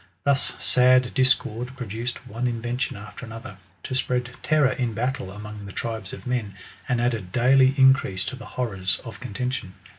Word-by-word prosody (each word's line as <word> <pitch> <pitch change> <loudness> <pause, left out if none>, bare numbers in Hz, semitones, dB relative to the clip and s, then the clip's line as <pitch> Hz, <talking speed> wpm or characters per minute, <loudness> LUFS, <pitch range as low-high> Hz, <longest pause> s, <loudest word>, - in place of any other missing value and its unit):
Thns 140 -1 +1
sad 125 0 +4
discord 130 -1 +1
produced 120 0 -4
one 120 +4 -2
invention 120 0 -2
after 105 +6 -10
another, 115 +2 -8 0.3
to - - -4
spread 125 -1 0
terror 150 -4 +3
in 120 -4 -1
battle 125 -2 -1
among 105 0 -8
the - - -7
tribes 110 -2 -4
of - - -9
men, 120 -6 -2 0.3
and 125 -1 +2
added 115 -7 0
dsolj 130 +4 +5
increase 130 -8 +4
to 130 - -4
the 130 - -10
horrors 95 -7 0
of 115 - -8
contention. 125 -4 -3
125 Hz, 160 wpm, -25 LUFS, 110-130 Hz, 0.3 s, dsolj